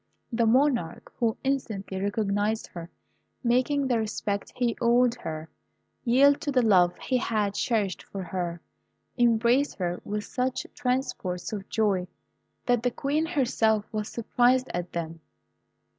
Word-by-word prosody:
The 230 0 +2
monarch, 250 - +1
who 230 -2 +1
instantly 215 -8 -2
recognised 205 +1 0
her, 170 -1 -9 0.5
making 255 +4 +2
the 245 -3 +1
respect 210 -2 -3
he 240 -2 0
owed 240 +1 +4
her 160 -9 -6 0.6
yield 275 +4 +5
to 295 - -1
the 255 -2 +3
love 180 -5 +4
he 255 - 0
had 210 -4 0
cherished 205 -4 0
for 195 -1 -4
her, 175 -1 -4 0.6
embraced 240 +3 +3
her 175 -2 -2
with 210 0 -3
such 255 +3 -2
transports 220 -8 -2
of 200 -2 -6
joy, 200 -5 +1 0.6
that 245 -2 +2
the 245 - +2
Queen 290 +6 -1
herself 230 -9 +1
was 215 -1 -2
surprised 245 +2 +2
at 175 0 -4
them. 165 -1 -4
225 Hz, 135 wpm, -27 LUFS, 195-250 Hz, 0.6 s, yield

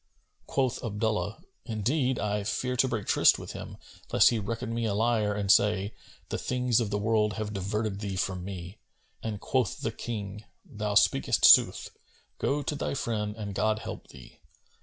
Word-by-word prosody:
Quoth 130 -3 0
Abdullah, 105 -3 -2 0.2
"Indeed, 125 +4 0
I 105 0 -1
fear 125 +4 -2
to 130 +1 +3
break 115 -5 -3
tryst - - +5
with - - -8
him, - - -8 0.3
lest - - +6
he 115 - 0
reckon 115 +3 -4
me 115 0 -1
a 105 -2 0
liar 110 -2 +1
and 100 -1 +2
say, 105 0 +3 0.4
'The - - -2
things 125 -2 +1
of 115 -3 -1
the 105 - -1
world 105 0 +1
have 105 -1 -4
diverted 100 +1 -2
thee 100 -2 -4
from 90 -1 -2
me,'" 95 +1 -7 0.4
and 110 -2 -4
quoth 125 -3 -1
the - - -1
King, 105 -3 -6 0.2
"Thou 105 -1 -4
speakest 105 - +3
sooth: - - +6 0.5
go 145 +1 0
to - - -2
thy 145 - -3
friend 105 -4 -2
and 105 -2 -5
God 110 +2 +1
help - - -7
thee!" - - -15
105 Hz, 175 wpm, -28 LUFS, 100-115 Hz, 0.5 s, lest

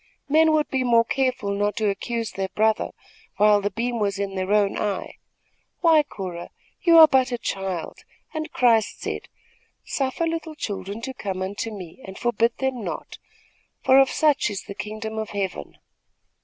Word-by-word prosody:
Men 315 +2 +5
would 305 -1 +2
be 260 -1 +1
more 230 -2 +4
careful 255 -6 0
not 205 +1 0
to 215 -2 0
accuse 230 +3 -2
their 195 0 -3
brother, 220 0 +2 0.5
while 210 0 +5
the 205 - 0
beam 235 +3 -2
was 200 -1 0
in 200 -1 -3
their 190 +1 -2
own 205 -1 +3
eye. 205 -2 -3 0.6
Why, 325 -3 +6
Cora, 185 -10 -7 0.3
you 335 -2 +6
are 320 -1 +11
but 260 -3 +2
a 245 - -1
child, 190 -6 -4 0.3
and 315 0 -4
Christ 230 -4 +2
said: - - -5 0.6
'Suffer 270 +4 -1
little 325 -1 -3
children 200 -3 -5
to 265 +2 -5
come 190 -6 -4
unto 200 +4 -3
me 195 0 -9
and 190 0 -9
forbid 235 0 +1
them 265 -3 -2
not, - - -6 0.6
for 265 +1 +6
of 270 - +5
such 295 -6 +2
is 200 -2 -5
the - - -8
kingdom 215 +2 -5
of 220 - -4
Heaven.' 190 - -4
220 Hz, 170 wpm, -24 LUFS, 200-265 Hz, 0.6 s, are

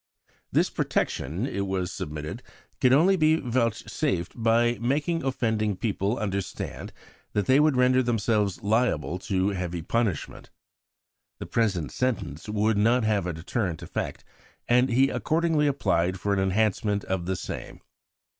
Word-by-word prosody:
This - - +2
protection, 85 - -1
it 100 -7 -2
was 95 -2 -2
submitted, 75 0 -5 0.4
could 125 - +4
only 170 +8 +5
be 155 -2 +4
vouchsafed 115 - -1
by 115 +1 +2
making 150 +8 0
offending 110 -6 0
people 105 +1 -1
understand 100 -2 -4 0.4
that 105 - +1
they 130 +2 +5
would 150 -2 +4
render 125 0 +4
themselves 110 -5 0
liable 100 - +1
to 95 0 0
heavy 90 -4 -3
punishment. 110 -4 -2 0.9
The - - -6
present 100 -9 0
sentence 105 - -2
would 105 0 +1
not 115 +3 +3
have 105 -4 +1
a 90 - -2
deterrent 85 +1 -3
effect, - - -5 0.4
and 125 +2 +4
he 130 +3 +4
accordingly 160 -2 +1
applied 95 -10 +1
for 100 +1 0
an 100 - +1
enhancement 100 +1 +1
of 90 -2 -3
the 95 - 0
same. - - -7
110 Hz, 135 wpm, -26 LUFS, 95-125 Hz, 0.9 s, only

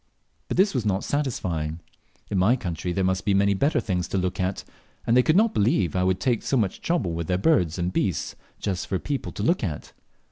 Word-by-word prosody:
But - - -3
this 195 +2 +4
was 125 -5 0
not 100 -2 0
satisfying; 85 - -2 0.5
in 100 - +1
my 105 +7 +4
country 90 -6 -4
there 95 +2 0
must 95 0 0
be 100 -2 +2
many 100 +1 +3
better 140 +8 +1
things 90 -6 -2
to - - -2
look 90 -1 -1
at, 95 +1 -1 0.4
and 115 - +3
they 125 - +7
could 155 +5 +2
not 220 +3 +4
believe 100 - +1
I 90 - +2
would 95 0 +1
take 120 -4 +1
so 135 - 0
much 105 -6 -1
trouble 165 - 0
with 85 -1 -3
their 90 - +1
birds 95 - +2
and 90 +1 -2
beasts 95 -6 -1 0.2
just 95 -3 -3
for 95 - 0
people 140 +7 -4
to - - -5
look 170 -4 +2
at. 80 -7 -4
95 Hz, 225 wpm, -25 LUFS, 90-125 Hz, 0.5 s, they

